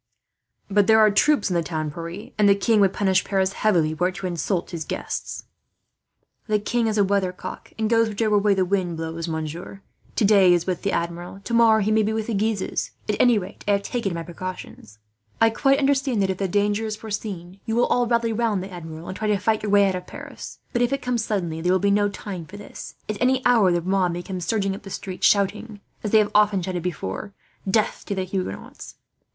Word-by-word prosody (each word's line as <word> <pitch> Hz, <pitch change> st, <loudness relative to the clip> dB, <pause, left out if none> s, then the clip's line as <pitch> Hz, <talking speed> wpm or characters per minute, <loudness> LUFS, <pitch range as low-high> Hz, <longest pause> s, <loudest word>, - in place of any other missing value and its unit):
"But 205 Hz, -1 st, +3 dB
there 220 Hz, -, +6 dB
are 215 Hz, -1 st, +6 dB
troops 290 Hz, 0 st, +3 dB
in -, -, +1 dB
the 170 Hz, -, +2 dB
town, 155 Hz, -1 st, -3 dB
Pierre, 170 Hz, +6 st, -7 dB
and 205 Hz, -1 st, +5 dB
the 200 Hz, -, +6 dB
king 215 Hz, +2 st, +2 dB
would 195 Hz, -2 st, +4 dB
punish 190 Hz, -2 st, +2 dB
Paris 190 Hz, -1 st, 0 dB
heavily, 170 Hz, -8 st, +2 dB
were 180 Hz, +3 st, +1 dB
it 185 Hz, -, -5 dB
to 195 Hz, -, -6 dB
insult 175 Hz, +1 st, -2 dB
his 165 Hz, -2 st, -4 dB
guests." -, -, -5 dB, 1.0 s
"The 215 Hz, -1 st, +2 dB
king 230 Hz, +3 st, 0 dB
is 215 Hz, -1 st, 0 dB
a 205 Hz, -, +5 dB
weathercock, 190 Hz, -2 st, -2 dB
and 220 Hz, -1 st, 0 dB
goes 230 Hz, 0 st, +3 dB
whichever 215 Hz, 0 st, +1 dB
way 200 Hz, -1 st, +3 dB
the 190 Hz, -1 st, +2 dB
wind 180 Hz, -3 st, -1 dB
blows, 165 Hz, +1 st, -4 dB
monsieur 165 Hz, +4 st, -5 dB, 0.3 s
today 200 Hz, -3 st, +5 dB
he 175 Hz, -, +6 dB
is 170 Hz, -, -1 dB
with 180 Hz, -2 st, -2 dB
the 200 Hz, -, -1 dB
Admiral, 175 Hz, +3 st, -4 dB
tomorrow 230 Hz, -2 st, +4 dB
he 210 Hz, +2 st, +1 dB
may 220 Hz, 0 st, +4 dB
be 215 Hz, +1 st, 0 dB
with 220 Hz, -1 st, -2 dB
the 230 Hz, -, -3 dB
Guises. 210 Hz, -1 st, -1 dB, 0.2 s
"At 210 Hz, -, +1 dB
any 245 Hz, -3 st, +5 dB
rate, 190 Hz, -2 st, -6 dB
I 205 Hz, -, +4 dB
have 200 Hz, 0 st, 0 dB
taken 210 Hz, -8 st, -2 dB
my 165 Hz, -, -4 dB
precautions. 175 Hz, -, -8 dB, 0.4 s
I 225 Hz, 0 st, +5 dB
quite 275 Hz, +4 st, +3 dB
understand 275 Hz, -4 st, +1 dB
that, 190 Hz, -, +1 dB
if 185 Hz, -, -5 dB
the 195 Hz, -, 0 dB
danger 205 Hz, +3 st, +1 dB
is 215 Hz, -, -3 dB
foreseen, 200 Hz, -4 st, -6 dB
you 225 Hz, -, 0 dB
will 240 Hz, -, +4 dB
all 245 Hz, -1 st, +1 dB
rally 235 Hz, -1 st, +1 dB
round 215 Hz, -4 st, 0 dB
the 190 Hz, 0 st, -9 dB
Admiral 160 Hz, -1 st, -8 dB
and 185 Hz, -, -5 dB
try 215 Hz, -, -3 dB
to 210 Hz, -1 st, +2 dB
fight 215 Hz, +3 st, 0 dB
your 210 Hz, -, -2 dB
way 200 Hz, -1 st, +5 dB
out 190 Hz, -, 0 dB
of 180 Hz, 0 st, -5 dB
Paris. -, -, -9 dB, 0.2 s
But 240 Hz, -, +1 dB
if 245 Hz, +1 st, +2 dB
it 275 Hz, -1 st, -2 dB
comes 245 Hz, -2 st, 0 dB
suddenly 175 Hz, -7 st, -2 dB
there 180 Hz, +2 st, +1 dB
will 185 Hz, -, +4 dB
be 200 Hz, +2 st, +1 dB
no 205 Hz, 0 st, +3 dB
time 190 Hz, -4 st, -7 dB
for 205 Hz, -, -10 dB
this. 205 Hz, -, -10 dB
At 215 Hz, -1 st, -4 dB
any 260 Hz, +1 st, +2 dB
hour 225 Hz, -7 st, +5 dB
the 175 Hz, -1 st, 0 dB
mob 185 Hz, -1 st, +1 dB
may 175 Hz, +1 st, -5 dB
come 185 Hz, 0 st, -5 dB
surging 195 Hz, +2 st, 0 dB
up 195 Hz, -, -8 dB
the 195 Hz, -, -10 dB
streets, 190 Hz, -1 st, -1 dB
shouting, 205 Hz, +2 st, 0 dB, 0.2 s
as 210 Hz, -, -1 dB
they 220 Hz, -, +5 dB
have 210 Hz, -1 st, +3 dB
often 210 Hz, -3 st, +3 dB
shouted 180 Hz, -1 st, -3 dB
before, 180 Hz, -, -5 dB, 0.3 s
'Death 215 Hz, +2 st, +1 dB
to 200 Hz, -, -2 dB
the 190 Hz, -, -1 dB
Huguenots!' 185 Hz, -, -6 dB
200 Hz, 235 wpm, -23 LUFS, 180-215 Hz, 1.0 s, there